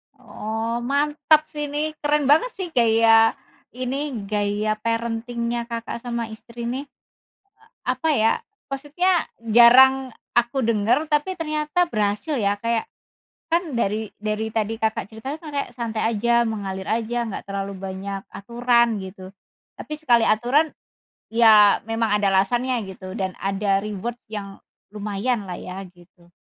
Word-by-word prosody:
Oh, 225 +2 -4
mantap 295 +4 +2
sih 295 -1 -3
ini, 300 +2 -2
keren 295 0 +1
banget 455 +12 +4
sih 375 -2 -4
gaya 225 -2 +5 0.4
ini, 265 +2 -3
gaya 210 +1 -1
parenting-nya 235 +1 -2
Kakak 230 0 -5
sama 235 -2 -4
istri 235 +2 -9
nih. 255 +4 -3
E - - -57 0.8
apa 320 - 0
ya, 225 -6 +3 0.3
maksudnya 310 +6 0 0.2
jarang 255 +3 +7 0.2
aku 240 +3 +2
dengar, 230 +7 +2
tapi 305 +5 0
ternyata 310 +2 0
berhasil 210 +3 -1
ya. 205 -2 0
Kayak 230 +1 -1 0.6
kan 335 -5 0
dari 215 -1 -1
dari 215 +1 -2
tadi 220 0 -1
Kakak 220 -3 -1
cerita 225 +6 -6
itu 320 - -11
kan 305 -2 -8
kayak 280 - -2
santai 230 -3 -3
aja, 235 +1 +2
mengalir 195 -3 -4
aja, 235 +1 -1
enggak 210 - -6
terlalu 195 0 -4
banyak 195 +1 -5
aturan 235 +1 +1
gitu. 190 0 -10 0.4
Tapi - - -9
sekali 240 -7 +3
aturan 250 +8 +2 0.6
ya 220 -3 +6
memang 225 -1 0
ada 200 -1 +2
alasannya 240 +4 +1
gitu 185 0 -9
dan 190 -3 -2
ada 195 0 0
reward 215 +3 -4
yang 200 -2 -7 0.3
lumayan 210 +2 -2
lah 180 - -5
ya, 190 +2 -7
gitu. 175 -1 -22
230 Hz, 140 wpm, -23 LUFS, 210-260 Hz, 0.8 s, jarang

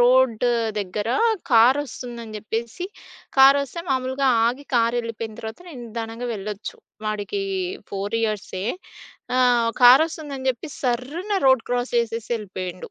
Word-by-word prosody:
Road 250 -1 +4 0.3
దగ్గర 205 +2 -3 0.4
కారొస్తుందని 240 -2 +2
జెప్పేసి 230 - -4 0.5
కారొస్తే 275 +3 +5
మామూలుగా 260 +1 0 0.2
ఆగి 255 +5 -2
కారెళ్ళిపోయిన 230 -1 0
తర్వాత 220 0 -7
నే - - -10
నిదానంగా 230 +1 -5
వెళ్ళొచ్చు. 210 0 -6 0.3
వాడికి 215 - -2 0.5
4 200 +3 -2
ఇయర్సే 210 -4 -2 0.7
ఆహ్, 240 -2 +4
కారొస్తుందని 280 +1 +5
జెప్పి 250 +5 -7
సర్రున 270 - -2
రోడ్ 260 -3 +5
క్రాస్ 245 0 -1
జేసేసి 230 -1 -2
యెళ్ళిపోయిండు. 185 -4 -6
235 Hz, 105 wpm, -23 LUFS, 220-260 Hz, 0.7 s, కారొస్తే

